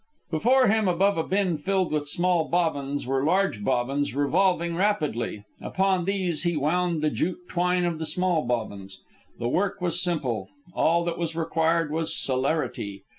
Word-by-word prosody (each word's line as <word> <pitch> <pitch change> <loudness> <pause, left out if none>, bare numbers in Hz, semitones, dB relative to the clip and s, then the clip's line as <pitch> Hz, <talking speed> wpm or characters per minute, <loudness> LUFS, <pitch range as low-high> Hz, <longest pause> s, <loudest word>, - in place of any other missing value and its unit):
Before 250 +11 +4
him, 220 0 +2
above 185 +1 +2
a - - +1
bin 185 -2 0
filled 190 +2 0
with 150 -1 -1
small 175 0 +1
bobbins, 145 -5 -1
were 135 +1 0
large 175 - +1
bobbins 135 +4 0
revolving 170 +4 +1
rapidly. 155 - -1 0.2
Upon 190 -2 0
these 185 -5 -1
he 170 -2 0
wound 165 +2 0
the 155 - +2
jute 180 +1 -3
twine 180 0 +1
of 170 -2 -2
the 160 - -3
small 175 +1 +1
bobbins. 100 -5 -4 0.4
The 120 - -2
work 190 +10 0
was 175 -1 0
simple. 130 - -1 0.2
All 170 +1 +2
that 170 0 -3
was 165 -1 -2
required 165 -1 +1
was 160 +1 -1
celerity. 130 -7 -1
165 Hz, 160 wpm, -26 LUFS, 145-180 Hz, 0.4 s, Before